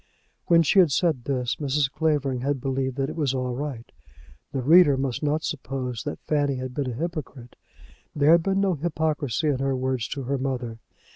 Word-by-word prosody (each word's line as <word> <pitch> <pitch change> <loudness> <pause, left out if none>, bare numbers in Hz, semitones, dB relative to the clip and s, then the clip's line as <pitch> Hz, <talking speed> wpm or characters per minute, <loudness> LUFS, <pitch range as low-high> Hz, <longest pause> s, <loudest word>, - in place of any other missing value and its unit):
When 165 -1 +5
she 175 +6 +4
had 175 -6 +5
said 150 -4 +1
this, 125 -3 -1
Mrs. 140 -1 0
Clavering 145 -5 0
had 140 +1 -1
believed 130 0 -2
that 135 0 -1
it - - -6
was 145 -5 0
all 125 -1 -2
right. 130 -3 -5 0.7
The 135 -2 -3
reader 155 -1 +6
must 130 -2 -2
not 150 +1 0
suppose 130 -5 -4
that - - -3
Fanny 145 -2 +1
had 130 0 -5
been 135 -1 -2
a - - -4
hypocrite. 145 -5 -6 0.6
There 150 +1 +4
had 170 0 +6
been 195 +3 0
no 195 -2 +2
hypocrisy 155 -3 -1
in 135 -3 0
her 135 0 0
words 130 -2 -1
to 140 - -5
her 135 +2 -2
mother. 125 -4 -3
140 Hz, 195 wpm, -25 LUFS, 130-155 Hz, 0.7 s, reader